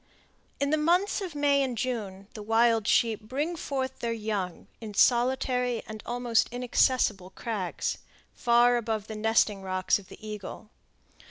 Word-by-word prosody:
In 280 Hz, 0 st, 0 dB
the 310 Hz, -, +2 dB
months 355 Hz, +7 st, +2 dB
of 360 Hz, -6 st, -5 dB
May 285 Hz, -1 st, +3 dB
and 255 Hz, -3 st, -1 dB
June, 205 Hz, -6 st, -3 dB
the 215 Hz, -, -8 dB
wild 225 Hz, 0 st, +3 dB
sheep 225 Hz, -3 st, +2 dB
bring 285 Hz, +10 st, -3 dB
forth 265 Hz, -4 st, -3 dB
their 235 Hz, -, -2 dB
young 210 Hz, -6 st, -3 dB, 0.2 s
in 215 Hz, -2 st, -7 dB
solitary 250 Hz, 0 st, +2 dB
and 215 Hz, -1 st, -8 dB
almost 240 Hz, -1 st, +1 dB
inaccessible 245 Hz, -5 st, +1 dB
crags, 200 Hz, -4 st, -3 dB, 0.3 s
far 240 Hz, +1 st, +4 dB
above 220 Hz, -3 st, -2 dB
the 220 Hz, -, -7 dB
nesting 215 Hz, -2 st, +2 dB
rocks 185 Hz, +1 st, +1 dB
of 190 Hz, -, -15 dB
the -, -, -11 dB
eagle. 210 Hz, +1 st, -8 dB
235 Hz, 150 wpm, -28 LUFS, 215-255 Hz, 0.3 s, far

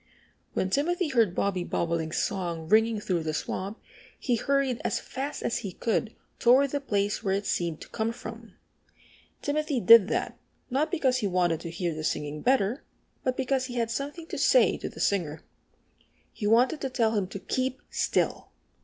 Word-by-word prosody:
When 190 Hz, -, -1 dB
Timothy 340 Hz, -, +1 dB
heard 225 Hz, -9 st, +2 dB
Bobby 190 Hz, -3 st, 0 dB
Bobolink's 165 Hz, -2 st, -1 dB
song 170 Hz, -4 st, -3 dB
ringing 220 Hz, +3 st, +4 dB
through 185 Hz, -4 st, -1 dB
the 155 Hz, -1 st, -2 dB
swamp 195 Hz, +6 st, -4 dB, 0.4 s
he 245 Hz, -, +1 dB
hurried 275 Hz, 0 st, 0 dB
as -, -, 0 dB
fast 275 Hz, +3 st, -5 dB
as 235 Hz, -, 0 dB
he 200 Hz, -6 st, -6 dB
could 225 Hz, +2 st, -1 dB, 0.2 s
toward 260 Hz, +3 st, +5 dB
the 285 Hz, -, -1 dB
place 205 Hz, -5 st, 0 dB
where 195 Hz, -1 st, 0 dB
it 200 Hz, +1 st, -2 dB
seemed 170 Hz, -5 st, -1 dB
to -, -, -10 dB
come 220 Hz, +1 st, -1 dB
from. 230 Hz, -, -10 dB, 0.9 s
Timothy 295 Hz, -2 st, 0 dB
did 230 Hz, -1 st, +8 dB
that, -, -, -2 dB, 0.3 s
not 290 Hz, +5 st, +1 dB
because 260 Hz, -5 st, +1 dB
he 220 Hz, -5 st, 0 dB
wanted 175 Hz, -3 st, +1 dB
to 170 Hz, -, -6 dB
hear 170 Hz, 0 st, -2 dB
the 155 Hz, 0 st, -5 dB
singing 150 Hz, -1 st, -2 dB
better, 250 Hz, 0 st, +1 dB, 0.4 s
but 255 Hz, -1 st, 0 dB
because 265 Hz, 0 st, 0 dB
he 250 Hz, -1 st, -7 dB
had 230 Hz, -1 st, 0 dB
something 290 Hz, +6 st, -4 dB
to -, -, -5 dB
say -, -, +5 dB
to -, -, -5 dB
the -, -, -12 dB
singer. 160 Hz, -6 st, 0 dB, 0.9 s
He 205 Hz, -, -3 dB
wanted 245 Hz, +8 st, +3 dB
to 270 Hz, -, -2 dB
tell 230 Hz, -4 st, +1 dB
him 200 Hz, -3 st, 0 dB
to 195 Hz, -, -7 dB
keep 260 Hz, +5 st, -2 dB
still. -, -, 0 dB
225 Hz, 180 wpm, -27 LUFS, 185-265 Hz, 0.9 s, did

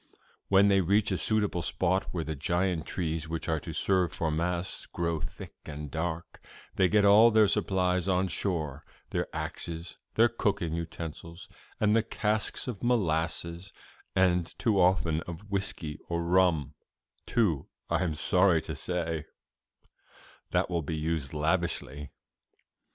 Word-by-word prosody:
When 100 Hz, +1 st, +5 dB
they 100 Hz, -1 st, +4 dB
reach 100 Hz, +4 st, +2 dB
a -, -, +2 dB
suitable 105 Hz, -5 st, +1 dB
spot 95 Hz, +2 st, +1 dB
where 85 Hz, -2 st, -2 dB
the 80 Hz, -, -3 dB
giant 85 Hz, +2 st, 0 dB
trees 80 Hz, -3 st, -2 dB
which 80 Hz, 0 st, -4 dB
are 80 Hz, -1 st, +1 dB
to 80 Hz, -, -7 dB
serve 90 Hz, +1 st, +1 dB
for 80 Hz, -2 st, -1 dB
masts 85 Hz, +3 st, -2 dB
grow 85 Hz, -2 st, -2 dB
thick -, -, -7 dB
and 75 Hz, -1 st, -7 dB
dark, 80 Hz, 0 st, -4 dB, 0.3 s
they 95 Hz, -2 st, +3 dB
get 105 Hz, +1 st, +4 dB
all 105 Hz, +3 st, +8 dB
their 110 Hz, -2 st, +5 dB
supplies 90 Hz, -2 st, +1 dB
on 95 Hz, 0 st, +2 dB
shore 80 Hz, -5 st, -2 dB, 0.3 s
their -, -, -1 dB
axes, 85 Hz, -1 st, -5 dB, 0.2 s
their -, -, +6 dB
cooking 80 Hz, -2 st, -1 dB
utensils 85 Hz, +1 st, -6 dB, 0.3 s
and 105 Hz, 0 st, +3 dB
the 115 Hz, -, +5 dB
casks 110 Hz, 0 st, -1 dB
of 115 Hz, -6 st, -5 dB
molasses' 85 Hz, -6 st, 0 dB, 0.4 s
and 90 Hz, -2 st, +2 dB
too 105 Hz, -4 st, +2 dB
often 90 Hz, -3 st, +3 dB
of 90 Hz, +4 st, -8 dB
whisky 90 Hz, -6 st, -3 dB
or 85 Hz, 0 st, -1 dB
rum, 85 Hz, -5 st, +2 dB, 0.5 s
too, 100 Hz, -, +1 dB, 0.2 s
I -, -, +1 dB
am 80 Hz, -4 st, -1 dB
sorry 90 Hz, +1 st, +3 dB
to -, -, -5 dB
say 80 Hz, -3 st, -2 dB, 1.2 s
'that -, -, +1 dB
will 85 Hz, -2 st, -1 dB
be 80 Hz, +1 st, -3 dB
used 80 Hz, -3 st, -2 dB
lavishly. 75 Hz, -3 st, -1 dB
85 Hz, 145 wpm, -29 LUFS, 80-95 Hz, 1.2 s, all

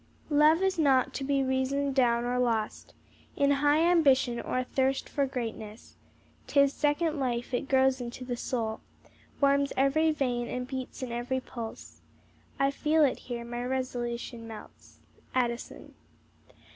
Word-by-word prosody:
"Love 305 Hz, +4 st, +5 dB
is 380 Hz, -2 st, +1 dB
not 270 Hz, -4 st, +3 dB
to 275 Hz, -, -4 dB
be 275 Hz, 0 st, +1 dB
reasoned 265 Hz, +1 st, 0 dB
down 240 Hz, -3 st, +3 dB
or 250 Hz, +1 st, 0 dB
lost, 225 Hz, -3 st, -1 dB, 0.4 s
In 280 Hz, 0 st, +3 dB
high 295 Hz, +2 st, +4 dB
ambition, 275 Hz, -8 st, +3 dB
or -, -, -3 dB
a 255 Hz, -, +1 dB
thirst 265 Hz, +1 st, 0 dB
for 280 Hz, -2 st, 0 dB
greatness; 225 Hz, -4 st, -6 dB, 0.5 s
'Tis 280 Hz, -1 st, +3 dB
second 305 Hz, +1 st, 0 dB
life, 245 Hz, -1 st, -2 dB
it 260 Hz, +2 st, -2 dB
grows 265 Hz, -1 st, +3 dB
into 245 Hz, +1 st, -6 dB
the 245 Hz, -1 st, -3 dB
soul, 230 Hz, -3 st, -3 dB, 0.6 s
Warms 280 Hz, 0 st, +3 dB
ev'ry 285 Hz, +4 st, +3 dB
vein, 250 Hz, -5 st, -1 dB
and 250 Hz, 0 st, -4 dB
beats 260 Hz, 0 st, -6 dB
in 250 Hz, -, -4 dB
ev'ry 240 Hz, +2 st, -2 dB
pulse; 235 Hz, -3 st, -9 dB, 0.6 s
I 275 Hz, 0 st, +2 dB
feel 305 Hz, +2 st, +2 dB
it 265 Hz, -, -1 dB
here; 235 Hz, -1 st, -4 dB
my 240 Hz, +1 st, -4 dB
resolution 240 Hz, -2 st, -3 dB
melts." 220 Hz, -1 st, -12 dB, 0.4 s
ADDISON. 240 Hz, -2 st, -2 dB
260 Hz, 145 wpm, -29 LUFS, 240-280 Hz, 0.6 s, Love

